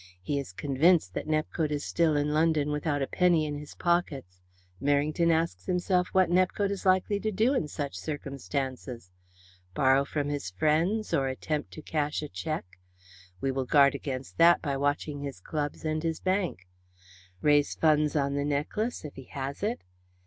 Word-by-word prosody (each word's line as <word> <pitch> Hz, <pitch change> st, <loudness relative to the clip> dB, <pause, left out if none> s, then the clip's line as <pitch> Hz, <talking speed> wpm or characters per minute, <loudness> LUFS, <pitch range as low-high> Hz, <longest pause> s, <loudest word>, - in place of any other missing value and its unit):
He 140 Hz, +11 st, -2 dB
is 135 Hz, -9 st, -6 dB
convinced 140 Hz, -, +2 dB
that -, -, -4 dB
Nepcote 155 Hz, 0 st, 0 dB
is 145 Hz, -1 st, -2 dB
still 165 Hz, -3 st, +2 dB
in 145 Hz, +1 st, 0 dB
London 155 Hz, -2 st, +2 dB
without 150 Hz, -1 st, -1 dB
a -, -, -2 dB
penny 175 Hz, -4 st, +3 dB
in 145 Hz, -1 st, -4 dB
his 150 Hz, -1 st, -11 dB
pockets. 140 Hz, -, -1 dB, 0.4 s
Merrington 145 Hz, +4 st, +2 dB
asks 160 Hz, -, -1 dB
himself 180 Hz, 0 st, +1 dB
what 190 Hz, -2 st, +3 dB
Nepcote 185 Hz, +2 st, +2 dB
is 195 Hz, -1 st, -3 dB
likely 185 Hz, +2 st, +3 dB
to 215 Hz, +1 st, -1 dB
do 225 Hz, +6 st, +2 dB
in 210 Hz, -, 0 dB
such 145 Hz, -1 st, -4 dB
circumstances? 135 Hz, -, -5 dB, 0.6 s
Borrow 135 Hz, +1 st, +4 dB
from 145 Hz, 0 st, -2 dB
his 145 Hz, -9 st, -3 dB
friends 160 Hz, -, +1 dB
or 135 Hz, -1 st, +2 dB
attempt 150 Hz, +3 st, -3 dB
to 155 Hz, -, -9 dB
cash 150 Hz, -1 st, -1 dB
a 150 Hz, -, -5 dB
cheque? 90 Hz, -, -5 dB, 0.6 s
We 135 Hz, -, 0 dB
will 130 Hz, 0 st, -2 dB
guard 140 Hz, +1 st, +5 dB
against 135 Hz, +1 st, -6 dB
that 170 Hz, +1 st, +7 dB
by 140 Hz, -3 st, -2 dB
watching 145 Hz, +1 st, -1 dB
his 140 Hz, -8 st, -6 dB
clubs 145 Hz, -, -4 dB
and 155 Hz, 0 st, -1 dB
his 165 Hz, -1 st, -2 dB
bank. 185 Hz, -, -1 dB, 0.8 s
Raise 145 Hz, -1 st, +3 dB
funds 150 Hz, -2 st, +2 dB
on 140 Hz, -1 st, +1 dB
the 140 Hz, 0 st, 0 dB
necklace 150 Hz, +10 st, -2 dB
if 150 Hz, -, -7 dB
he 135 Hz, -, -9 dB
has 135 Hz, +1 st, -5 dB
it? 215 Hz, +4 st, -2 dB
150 Hz, 170 wpm, -28 LUFS, 140-170 Hz, 0.8 s, that